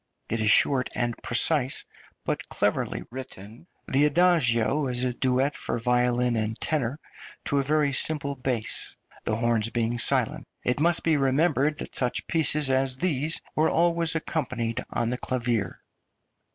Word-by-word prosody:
It 115 Hz, 0 st, -1 dB
is 110 Hz, -, +2 dB
short 130 Hz, +3 st, +4 dB
and 120 Hz, -1 st, -1 dB
precise, 130 Hz, +3 st, +3 dB, 0.4 s
but -, -, -4 dB
cleverly -, -, -2 dB
written. 120 Hz, -, -9 dB, 0.2 s
The 140 Hz, +2 st, +2 dB
adagio 145 Hz, -5 st, +2 dB
is 125 Hz, 0 st, -2 dB
a 125 Hz, -1 st, -1 dB
duet 130 Hz, +3 st, 0 dB
for -, -, -4 dB
violin 125 Hz, 0 st, 0 dB
and 110 Hz, +1 st, -3 dB
tenor, 145 Hz, -2 st, -1 dB, 0.5 s
to 140 Hz, -, 0 dB
a -, -, 0 dB
very 145 Hz, 0 st, 0 dB
simple 140 Hz, +1 st, +3 dB
bass, 125 Hz, -4 st, -1 dB, 0.3 s
the 110 Hz, -, -1 dB
horns 115 Hz, -1 st, +1 dB
being 120 Hz, 0 st, -2 dB
silent. -, -, +2 dB, 0.2 s
It 125 Hz, +3 st, -1 dB
must 170 Hz, +2 st, +2 dB
be 160 Hz, -2 st, +2 dB
remembered 145 Hz, +1 st, +1 dB
that -, -, -6 dB
such 125 Hz, -2 st, +1 dB
pieces 150 Hz, -3 st, +3 dB
as 130 Hz, -1 st, 0 dB
these 155 Hz, -1 st, 0 dB
were 155 Hz, +1 st, +2 dB
always 170 Hz, 0 st, +2 dB
accompanied 120 Hz, -8 st, -3 dB
on 120 Hz, 0 st, -2 dB
the 125 Hz, -, -3 dB
clavier. 120 Hz, -4 st, -2 dB
130 Hz, 150 wpm, -25 LUFS, 120-150 Hz, 0.5 s, short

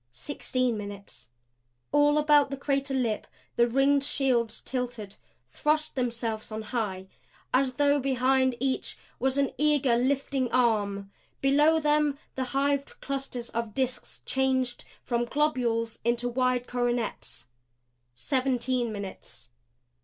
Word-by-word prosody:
Sixteen 255 Hz, -, -2 dB
minutes. 200 Hz, -, -9 dB, 0.6 s
All 290 Hz, 0 st, +4 dB
about 295 Hz, -2 st, +5 dB
the 275 Hz, -, -4 dB
crater 275 Hz, 0 st, 0 dB
lip 235 Hz, -5 st, -1 dB, 0.3 s
the 235 Hz, 0 st, +4 dB
ringed 275 Hz, +3 st, +3 dB
shields 245 Hz, -5 st, +1 dB
tilted; 240 Hz, -6 st, -4 dB, 0.4 s
thrust 305 Hz, +1 st, 0 dB
themselves 230 Hz, -4 st, -3 dB
on 215 Hz, 0 st, -4 dB
high, 205 Hz, -5 st, -3 dB, 0.5 s
as 260 Hz, 0 st, +3 dB
though 285 Hz, +2 st, +3 dB
behind 260 Hz, -1 st, +2 dB
each 265 Hz, +1 st, -1 dB, 0.2 s
was 265 Hz, +1 st, +1 dB
an 280 Hz, -1 st, +2 dB
eager 290 Hz, -5 st, +3 dB
lifting 260 Hz, 0 st, 0 dB
arm. 205 Hz, -5 st, +1 dB, 0.3 s
Below 295 Hz, +4 st, +4 dB
them 300 Hz, -1 st, +2 dB, 0.2 s
the 260 Hz, -, -2 dB
hived 280 Hz, +1 st, -1 dB
clusters 270 Hz, -3 st, -4 dB
of 230 Hz, -2 st, -3 dB
disks 260 Hz, -1 st, -3 dB
changed 260 Hz, -2 st, 0 dB, 0.2 s
from 240 Hz, -1 st, 0 dB
globules 240 Hz, -5 st, 0 dB
into 235 Hz, +1 st, +1 dB
wide 250 Hz, 0 st, +1 dB
coronets. 245 Hz, -2 st, -2 dB, 0.7 s
Seventeen 255 Hz, -, 0 dB
minutes. 200 Hz, -, -7 dB
255 Hz, 115 wpm, -28 LUFS, 235-275 Hz, 0.7 s, about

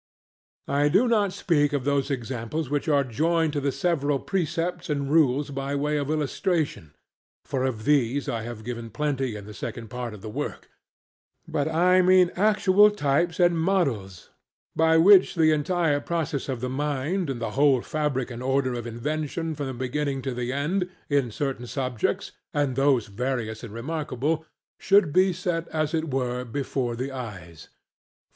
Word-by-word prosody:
I 145 Hz, +1 st, +2 dB
do 200 Hz, +11 st, +4 dB
not 210 Hz, -4 st, +2 dB
speak 150 Hz, -6 st, +1 dB
of 140 Hz, -3 st, 0 dB
those 140 Hz, -1 st, +1 dB
examples 130 Hz, +3 st, -3 dB
which 145 Hz, +1 st, -1 dB
are 140 Hz, -2 st, +4 dB
joined 160 Hz, +5 st, 0 dB
to 145 Hz, -, -1 dB
the 140 Hz, 0 st, 0 dB
several 145 Hz, -2 st, 0 dB
precepts 175 Hz, +1 st, -2 dB
and 140 Hz, -1 st, -1 dB
rules 145 Hz, -2 st, +3 dB
by 135 Hz, +1 st, -3 dB
way 150 Hz, +1 st, 0 dB
of 145 Hz, -1 st, -2 dB
illustration 155 Hz, -, -1 dB, 0.5 s
(for 135 Hz, -2 st, -2 dB
of 115 Hz, -5 st, -3 dB
these 140 Hz, -2 st, +2 dB
I 115 Hz, -, -2 dB
have 115 Hz, -1 st, -7 dB
given 115 Hz, -1 st, -5 dB
plenty 135 Hz, -1 st, -2 dB
in 105 Hz, -1 st, -8 dB
the 105 Hz, -, -9 dB
second 115 Hz, +3 st, -6 dB
part 125 Hz, -3 st, -5 dB
of 105 Hz, -, -14 dB
the -, -, -6 dB
work); -, -, -5 dB, 0.8 s
but 145 Hz, +1 st, -1 dB
I 180 Hz, +3 st, +4 dB
mean 180 Hz, -1 st, +5 dB
actual 205 Hz, 0 st, +5 dB
types 170 Hz, -2 st, 0 dB
and 175 Hz, -2 st, +4 dB
models, 135 Hz, -, -1 dB, 0.4 s
by 160 Hz, 0 st, +4 dB
which 190 Hz, +3 st, +6 dB
the 160 Hz, -2 st, +4 dB
entire 155 Hz, 0 st, +1 dB
process 150 Hz, -3 st, -3 dB
of 130 Hz, -3 st, -3 dB
the 130 Hz, -, -1 dB
mind 145 Hz, +6 st, -1 dB
and 130 Hz, -3 st, -3 dB
the 115 Hz, -, -3 dB
whole 135 Hz, -3 st, +3 dB
fabric 140 Hz, -5 st, -2 dB
and 120 Hz, 0 st, -7 dB
order 130 Hz, 0 st, +1 dB
of 120 Hz, -1 st, -4 dB
invention 155 Hz, +7 st, -3 dB
from 145 Hz, -2 st, -4 dB
the 130 Hz, -, -4 dB
beginning 135 Hz, +2 st, -2 dB
to 135 Hz, -, -2 dB
the 125 Hz, 0 st, -3 dB
end, 175 Hz, +7 st, -1 dB, 0.2 s
in 140 Hz, -4 st, +2 dB
certain 125 Hz, +1 st, -3 dB
subjects, 125 Hz, -4 st, -2 dB, 0.2 s
and 145 Hz, -3 st, +1 dB
those 135 Hz, -3 st, +3 dB
various 115 Hz, 0 st, -3 dB
and 115 Hz, -, -7 dB
remarkable, 150 Hz, +4 st, -2 dB, 0.3 s
should 195 Hz, -6 st, +4 dB
be 185 Hz, +2 st, +4 dB
set 170 Hz, -2 st, -2 dB
as 155 Hz, 0 st, -2 dB
it 160 Hz, -2 st, -1 dB
were 125 Hz, -1 st, -1 dB
before 125 Hz, -1 st, -2 dB
the 130 Hz, +3 st, -4 dB
eyes. 95 Hz, -, -8 dB
145 Hz, 170 wpm, -25 LUFS, 125-160 Hz, 0.8 s, which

